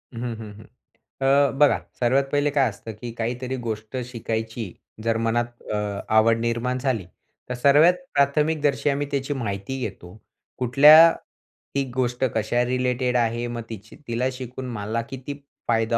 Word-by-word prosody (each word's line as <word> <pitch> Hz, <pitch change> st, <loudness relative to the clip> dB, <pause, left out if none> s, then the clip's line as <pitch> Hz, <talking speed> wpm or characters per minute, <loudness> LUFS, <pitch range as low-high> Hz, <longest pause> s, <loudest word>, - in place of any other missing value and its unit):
हं, -, -, -5 dB, 0.2 s
हं, 110 Hz, -2 st, -9 dB
हं. -, -, -13 dB, 0.6 s
अ, 140 Hz, 0 st, +4 dB
बघा, 145 Hz, -1 st, +5 dB, 0.2 s
सर्वात 130 Hz, +3 st, +3 dB
पहिले 145 Hz, 0 st, +2 dB
काय 140 Hz, -3 st, +3 dB
असतं 110 Hz, +2 st, -9 dB
की 120 Hz, -1 st, -5 dB
काहीतरी 125 Hz, +3 st, -3 dB
गोष्ट 110 Hz, +2 st, -4 dB
शिकायची 110 Hz, -3 st, -4 dB, 0.3 s
जर 115 Hz, -1 st, +1 dB
मनात 120 Hz, +1 st, -1 dB
अ, 105 Hz, -, 0 dB, 0.4 s
आवड 115 Hz, +1 st, +5 dB
निर्माण 120 Hz, +2 st, -1 dB
झाली 125 Hz, -7 st, -1 dB, 0.4 s
तर 125 Hz, -, -1 dB
सर्वात 145 Hz, +7 st, +5 dB, 0.2 s
प्राथमिकदर्शी 145 Hz, 0 st, +2 dB
आम्ही 140 Hz, +1 st, -1 dB
त्याची 140 Hz, 0 st, -1 dB
माहिती 110 Hz, -1 st, -4 dB
घेतो. 95 Hz, -4 st, -7 dB, 0.4 s
कुठल्या 150 Hz, +7 st, +8 dB, 0.7 s
ही 140 Hz, -, +2 dB
गोष्ट 125 Hz, 0 st, -1 dB
कशा 110 Hz, +3 st, +1 dB
रिलेटेड 125 Hz, 0 st, 0 dB
आहे, 120 Hz, 0 st, 0 dB
मग 120 Hz, 0 st, -4 dB
तिच 110 Hz, -1 st, -9 dB, 0.2 s
तिला 120 Hz, +2 st, 0 dB
शिकून 130 Hz, 0 st, -7 dB
मला 110 Hz, +1 st, -2 dB
किती 135 Hz, +1 st, -6 dB, 0.3 s
फायदा 115 Hz, 0 st, +2 dB
120 Hz, 145 wpm, -24 LUFS, 115-135 Hz, 0.7 s, कुठल्या